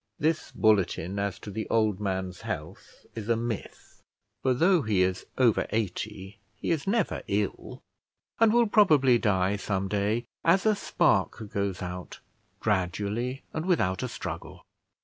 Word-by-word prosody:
This 155 +1 0
bulletin 100 -3 +1
as 100 -1 -2
to 105 - -9
the 110 +2 -4
old 110 -3 +2
man's 95 -3 -3
health - - -7
is 110 -1 -6
a 115 - +3
myth; 115 -2 -6 0.4
for 130 -1 +2
though 175 +5 +4
he 105 -7 +2
is 95 0 -2
over 120 -4 +3
eighty 100 -1 -3 0.2
he 110 - -3
is 160 -1 -1
never 215 -1 +1
ill, 100 0 -2 0.6
and 225 -1 +6
will 235 +1 +4
probably 150 - +5
die 100 -2 +1
some 100 -1 -2
day, 105 +4 0 0.2
as 180 +4 +4
a 215 - +5
spark 110 - +1
goes 100 -2 -2
out, 90 0 -7 0.4
gradually 105 +6 -1
and 160 +3 -3
without 95 - +1
a - - -1
struggle. - - -7
105 Hz, 150 wpm, -28 LUFS, 95-135 Hz, 0.6 s, and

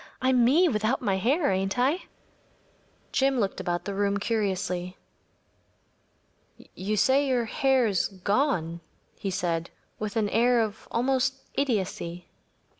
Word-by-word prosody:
I’m 255 -1 +3
me 310 +10 +5
without 225 -1 0
my 195 -4 +1
hair, 275 - +2
ain’t 195 +2 -1
I?‚ÄĚ 275 +9 +1 1.0
Jim 270 -1 +2
looked 200 -3 -1
about 175 0 -2
the 200 - -3
room 200 0 +1
curiously. 190 -4 -2 1.8
“You 210 +3 -2
say 270 +6 +3
your 250 -3 +1
hair 265 +2 +2
is 200 -5 +1
gone?‚ÄĚ 185 - -2
he 195 - -2
said, 170 -2 -2 0.3
with 210 0 -4
an 220 -2 +1
air 230 -2 +2 0.2
almost 260 +2 +1
of - - -28
idiocy. 185 -9 -2
215 Hz, 125 wpm, -27 LUFS, 190-260 Hz, 1.8 s, me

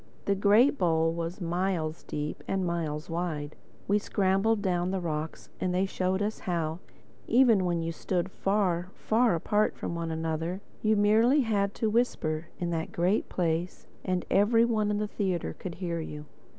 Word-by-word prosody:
The 200 - +2
great 210 +8 +4
bowl 165 -2 +2
was 170 +2 -4
miles 175 -2 -1
deep 150 0 -5
and 190 -1 0
miles 165 -2 -2
wide. 165 -4 -3 0.3
We 205 +1 +3
scrambled 200 +2 +1
down 180 -2 +1
the 190 0 -1
rocks 160 -2 -4
and 180 -1 -1
they 185 +1 +2
showed 190 +1 -1
us 215 +1 -2
how, 165 -3 -2 0.5
even 230 -6 +5
when 170 -2 0
you 165 - -2
stood 180 +2 -2
far, 185 -4 0
far 225 -3 +2
apart 210 +6 +1
from - - -4
one 170 -1 -3
another, 160 +2 -2 0.2
you 215 0 +3
merely 220 +7 +4
had 205 -4 0
to 220 - 0
whisper 165 -9 0
in 175 -1 -2
that 165 -1 -2
great 180 +5 +1
place 170 0 -1 0.2
and 185 -2 -1
every 225 +3 +4
one 215 -3 +1
in 210 - 0
the 210 0 -1
theatre 190 -4 -2
could 175 -3 -6
hear 170 -2 -3
you. 150 -2 -6
180 Hz, 170 wpm, -28 LUFS, 165-205 Hz, 0.5 s, even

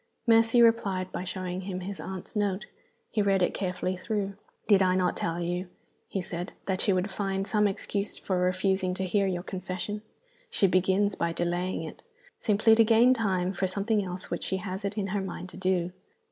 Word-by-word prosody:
Mercy 230 +1 +6
replied 195 -5 +2
by - - -4
showing 185 0 -4
him 185 -1 -4
his 195 +1 -5
aunt's 190 +1 -6
note. 205 -2 0 0.5
He 215 - +1
read 195 -2 +3
it - - +1
carefully 185 -1 -2
through. 200 +1 -2 0.3
"Did 200 -2 +6
I 185 -1 +4
not 185 -1 +1
tell 165 +1 -2
you," 175 +2 -2 0.4
he 195 - -3
said, 175 +1 -5
"that 190 -1 0
she 205 - +3
would 185 +2 0
find 195 0 -1
some 210 0 +3
excuse 200 +1 -2
for 185 -2 -1
refusing 185 0 +1
to 190 - -2
hear 195 +2 +2
your 180 -2 -2
confession? 185 +3 -4 0.5
She 210 - +2
begins 190 +2 +3
by 170 -2 -1
delaying 175 0 -1
it, 160 - -8 0.4
simply 220 +1 +4
to 225 +1 +7
gain 230 +3 +6
time 190 -6 0
for 190 +1 0
something 205 +3 0
else 180 0 -6
which - - -2
she 190 - -1
has 190 +1 -5
it 200 +1 -3
in 205 - 0
her 205 - 0
mind 185 -1 -6
to - - -11
do. 185 -2 0
190 Hz, 195 wpm, -28 LUFS, 185-205 Hz, 0.5 s, to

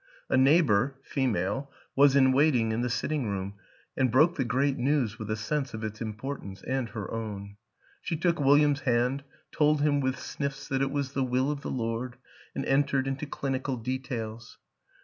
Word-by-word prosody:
A - - +4
neighbor 135 -3 +4
(fe 135 -2 -1
male) 105 +6 -1 0.2
was 140 0 +6
in 130 -1 +6
waiting 130 -5 +3
in 110 +2 -1
the 125 - 0
sitting 140 +1 -1
room 100 0 -3 0.4
and 130 -1 +2
broke 155 +7 +5
the 135 - 0
great 130 +4 +1
news 125 -4 +1
with 110 -1 -6
a 110 - 0
sense 135 +4 -2
of 110 - -6
its 110 0 -5
importance 110 -3 -6
and 130 -3 -2
her 105 -5 -6
own; 100 -3 -5 0.4
she 165 - -2
took 170 0 +1
William's 145 +1 +4
hand, 125 +1 +1 0.3
told 150 -1 +3
him 145 -1 +3
with 130 0 0
sniffs 140 -1 -4
that 135 0 0
it 135 - +1
was 140 -1 -2
the 135 - +1
will 130 +2 +1
of 145 -1 -4
the - - -5
Lord, 120 +1 -3 0.4
and - - -2
entered 135 -1 +2
into 135 +2 -3
clinical 135 -1 -2
details. 115 -2 -5
130 Hz, 185 wpm, -28 LUFS, 115-140 Hz, 0.4 s, was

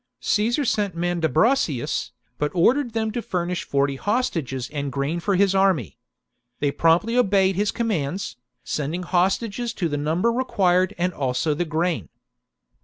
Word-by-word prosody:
Caesar 235 +7 +1
sent 205 -6 0
Mandu 170 -1 0
bracius, 160 - +1 0.3
but 150 - +1
ordered 240 +8 +3
them 220 -1 -1
to 240 +2 -3
furnish 180 -3 -2
forty 140 0 0
hostages 160 - -1
and 145 -2 -3
grain 140 +6 -1
for 195 +3 0
his 195 0 +3
army. 190 - +1 0.6
They 145 -1 +1
promptly 170 +10 +2
obeyed 195 -5 +3
his 205 +2 +1
commands, 190 - -2 0.3
sending 155 +5 -3
hostages 200 +6 0
to 175 - -1
the 145 -2 -2
number 160 +10 +1
required 190 -6 +1
and 180 +1 0
also 135 +2 0
the 175 +4 -1
grain. 160 - -1
180 Hz, 145 wpm, -23 LUFS, 150-210 Hz, 0.6 s, ordered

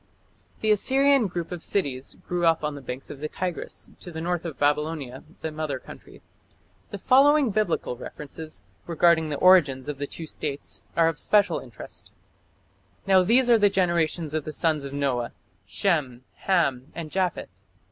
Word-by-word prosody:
The 215 - +2
Assyrian 270 +3 +4
group 175 -2 -5
of 175 -2 -6
cities 140 -9 -2
grew 175 0 -1
up 165 -2 +3
on 150 0 -1
the 140 - -8
banks 130 +1 -7
of 140 - -9
the 155 +1 -4
Tigris 180 0 -5
to 175 - -9
the 160 - -6
north 175 +1 -2
of 160 -6 -5
Babylonia, 145 -3 -1 0.2
the 160 - -3
mother 155 -3 -3
country. - - -14 0.7
The 200 - -6
following 275 +4 +4
Biblical 195 -11 -1
references 150 +5 -8 0.2
regarding 170 -1 +3
the 145 - -2
origins 145 -8 +4
of 145 -2 -5
the 145 - -3
two 165 - -6
states 145 -2 -5 0.2
are 165 -1 +5
of 165 -2 -1
special 205 -1 +3
interest: - - -12 0.9
Now 190 -1 +5
these 240 +7 +4
are 230 - +6
the 205 -1 +5
generations 170 -4 0
of 155 -1 -1
the 155 - -6
sons 155 -4 0
of 140 - -6
Noah: 130 -4 -1 0.3
Shem, 140 -10 -1
Ham, 145 -8 0
and 165 -2 -6
Japheth.... 185 -3 -1
165 Hz, 165 wpm, -25 LUFS, 145-185 Hz, 0.9 s, are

